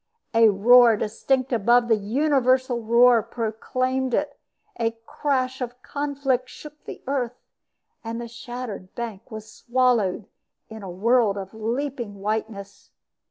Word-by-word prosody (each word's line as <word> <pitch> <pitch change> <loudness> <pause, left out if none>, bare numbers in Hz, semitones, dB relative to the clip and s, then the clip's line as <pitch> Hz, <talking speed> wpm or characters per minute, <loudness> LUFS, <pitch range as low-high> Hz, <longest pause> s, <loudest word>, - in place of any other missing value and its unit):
A 225 -1 +6
roar 230 +3 +6
distinct 255 +5 -1
above 235 +2 +3
the 225 - +4
universal 255 +2 +1
roar 235 +1 +5
proclaimed 255 +4 -2
it; 290 -1 -2 0.4
a 230 0 -1
crash 260 -2 -1
of 245 0 -5
conflict 280 -3 -2
shook 300 0 -13
the - - -9
earth, 255 -3 -2 0.7
and 230 0 -5
the 240 - -6
shattered 235 -4 -8
bank 230 -5 -6
was 220 -1 -8
swallowed 235 -7 +1 0.4
in 220 -1 -9
a 195 - -7
world 215 +3 +2
of 195 0 -7
leaping 235 0 -3
whiteness. 205 -1 -5
235 Hz, 125 wpm, -24 LUFS, 220-255 Hz, 0.7 s, A